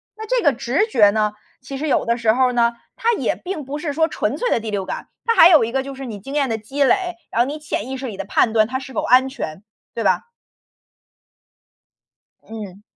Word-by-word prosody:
那 435 0 -8
这 - - +1
个 290 - +4
直 270 - 0
觉 215 - +5
呢， 210 0 0 0.3
其 270 +2 -7
实 305 +3 -3
有 - - +1
的 235 - +1
时 230 -2 +2
候 255 +1 +2
呢， 235 -1 +2 0.2
它 475 -1 +1
也 - - -1
并 355 -6 -6
不 285 +3 -5
是 300 -1 -3
说 320 +3 +2
纯 - - -2
粹 - - -1
的 - - +2
第 225 0 -6
六 200 -2 -2
感， - - -6 0.2
它 460 - +3
还 350 -6 +8
有 315 -9 +6
一 230 - -5
个 265 +1 0
就 275 0 -7
是 270 0 -7
你 215 -4 -7
经 270 +9 -8
验 285 -2 +2
的 225 -2 -2
积 270 +7 -1
累， 360 +4 +1 0.2
然 235 - +2
后 245 - +2
你 295 +2 -4
潜 295 -6 -4
意 265 - -4
识 260 - -6
里 220 - -5
的 195 - -3
判 220 +3 +1
断， 220 -1 +4
它 260 - -2
是 260 0 -9
否 - - -1
安 255 +2 +4
全， 190 - -6 0.3
对 230 - -2
吧。 - - +1 2.2
嗯。 205 -3 -9
260 Hz, 260 characters per minute, -20 LUFS, 225-300 Hz, 2.2 s, 还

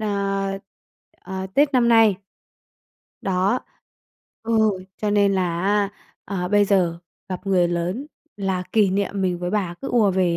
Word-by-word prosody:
ờ, 195 -2 -1 0.7
ờ, 190 0 -5
Tết 285 0 +3
năm 245 -3 +3
nay. 225 -4 +5 1.0
Đó, 190 +5 +1 0.8
ừ, 225 0 +1 0.4
cho 210 - -1
nên 205 -1 +3
là 175 -3 0
á, 205 0 +2 0.4
ờ, 180 -3 -3
bây 205 +1 +4
giờ 180 -4 +1 0.3
gặp 185 +1 -6
người 180 -3 +3
lớn 175 +10 -2 0.3
là 190 -2 -1
kỷ 210 -4 +4
niệm 200 0 -1
mình 180 -2 0
với 175 0 -3
bà 190 -4 -1
cứ 275 - -3
ùa 220 -5 +3
về 180 -2 +1
195 Hz, 150 wpm, -22 LUFS, 185-210 Hz, 1.0 s, nay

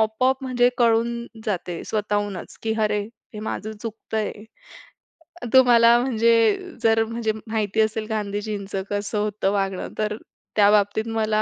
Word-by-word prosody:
आपोआप 255 +5 +1
म्हणजे 245 -1 +3
कळून 235 0 +3 0.3
जाते 180 -4 -3
स्वतःहूनच, 205 -3 -3
की 220 0 -1
अरे 210 0 +1 0.3
हे 210 - -6
माझं 215 0 -4
चुकतंय. 220 -1 -3 1.2
तुम्हाला 240 -2 +7
म्हणजे 230 -2 +3 0.5
जर 225 0 +4
म्हणजे 230 -1 -2 0.2
माहिती 220 -1 0
असेल 215 0 0
गांधीजींचं 205 -2 -3
कसं 205 +1 -2
होतं 210 -2 0
वागणं, 195 -2 -2
तर 215 0 -1 0.4
त्या 205 -1 +6
बाबतीत 210 +1 +2
मला 220 -1 +1
215 Hz, 125 wpm, -23 LUFS, 205-230 Hz, 1.2 s, तुम्हाला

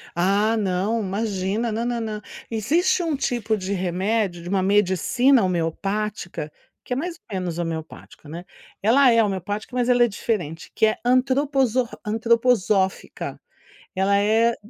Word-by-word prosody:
Ah, 200 +5 +2
não, 200 +2 0
imagina 200 +2 -2
na 225 +2 -2
na 240 -1 -1
na 215 -2 -4 0.3
existe 315 - +1
um 325 -4 -1
tipo 235 -5 -1
de 195 -1 -4
remédio 190 0 -1
de 175 - -8
uma 190 0 +1
medicina 210 - +3
homeopática 185 0 -2 0.3
que - - -6
é - - -5
mais 335 +5 -3
ou 215 - -12
menos 180 -3 -3
homeopático, 160 -2 -6
né, 170 +3 -8 0.4
ela 250 +5 +5
é 230 0 +5
homeopática, 205 +3 -3
mas 245 0 +1
ela 245 -1 +5
é - - +2
diferente 175 -7 -3
que 220 - +3
é 215 - +1
antroposo 260 0 +2 0.2
antroposófica, 220 -3 +1 0.6
ela 195 +1 +3
é 225 +3 +3
215 Hz, 145 wpm, -23 LUFS, 190-240 Hz, 0.6 s, ela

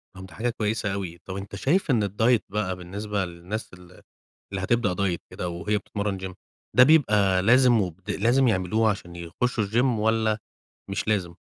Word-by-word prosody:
طب 95 0 -9
ده 95 - -14
حاجة 120 +3 -1
كويسة 110 -2 -1
أوي، 95 -4 -5
طب 95 - -6
أنت 100 0 -7
شايف 150 - +1
إن 115 -5 +2
الdiet 110 +4 +3
بقى 100 -2 -2
بالنسبة 100 +2 -3
للناس 90 +6 -7
اللي 90 0 -15 0.5
اللي 95 -2 -3
هتبدأ 120 -4 +1
diet 95 -3 0
كده 90 - -4
وهي 85 +5 -1
بتتمرّن 100 -1 -3
gym 95 0 -6 0.4
ده 125 - +9
بيبقى 105 -11 +4
لازم 120 +1 +5
وبد 90 +2 -5
لازم 120 +6 +3
يعملوه 110 +1 +2
عشان 90 -4 -4
يخشوا 105 +8 -2
الgym 115 +5 +1 0.2
والَّا 110 0 +1 0.5
مش 100 +2 -3
لازم؟ 95 -6 0
100 Hz, 170 wpm, -25 LUFS, 95-110 Hz, 0.5 s, ده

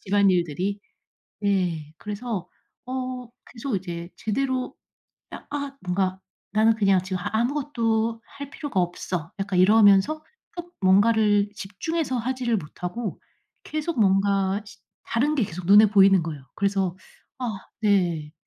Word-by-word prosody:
집안일들이. 190 -1 +1 0.7
예 175 -6 0
그래서 210 -3 -5 0.4
어 255 -1 -4 0.2
계속 245 -1 -3
이제 170 -2 -5
제대로 255 +3 -2 0.6
'아 - - -9
아 285 -1 -4
뭔가 185 +1 -1 0.3
나는 220 +2 +4
그냥 195 -4 +3
지금 185 0 -3
하 180 - -3
아무것도 230 -3 0
할 280 0 -9
필요가 280 - -2
없어.' 175 0 -3
약간 195 -1 -1
이러면서 205 +5 +6 0.4
어 345 - -3 0.2
뭔가를 205 +1 +4
집중해서 255 +8 -3
하지를 245 -1 -1
못하고 180 +6 -5 0.4
계속 310 -2 -3
뭔가 195 0 +2
시 - - -13 0.3
다른 285 +7 0
게 265 - +2
계속 180 0 -8
눈에 205 +2 +8
보이는 195 -2 +5
거예요. 150 -4 -6
그래서 195 -2 0 0.4
아 250 - -2 0.3
네 175 -7 +1
205 Hz, 265 characters per minute, -25 LUFS, 185-240 Hz, 0.7 s, 눈에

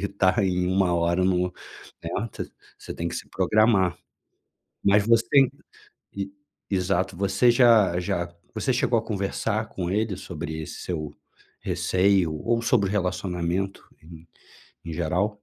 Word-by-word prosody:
e - - -3
e - - 0
tá 95 -1 +2
em 90 -1 0
1 95 -1 +2
hora 85 +2 +1
no 90 -1 +1 0.5
né, - - -4 0.7
se - - -8
tem 85 - -3
que - - -6
se - - -6
programar. 105 -4 +3 0.9
Mas 100 +1 +4
você 115 +4 +4 0.7
e 100 0 -4 0.4
exato. 95 -1 0
Você 100 +6 +3
já 115 -7 +5
já 85 -1 -2 0.2
você 120 +4 0
chegou 120 -1 +1
a 110 - -2
conversar 110 +1 -2
com 90 -4 -3
ele 105 -1 0
sobre 80 -2 -6
esse - - -8
seu 75 -5 -4 0.5
receio 95 -3 +2
ou 115 +10 -1
sobre 110 -5 +2
relacionamento, 90 -1 -2 0.2
em 80 0 -14 0.6
em 80 - -5
geral? 90 +5 0
95 Hz, 140 wpm, -25 LUFS, 85-105 Hz, 0.9 s, já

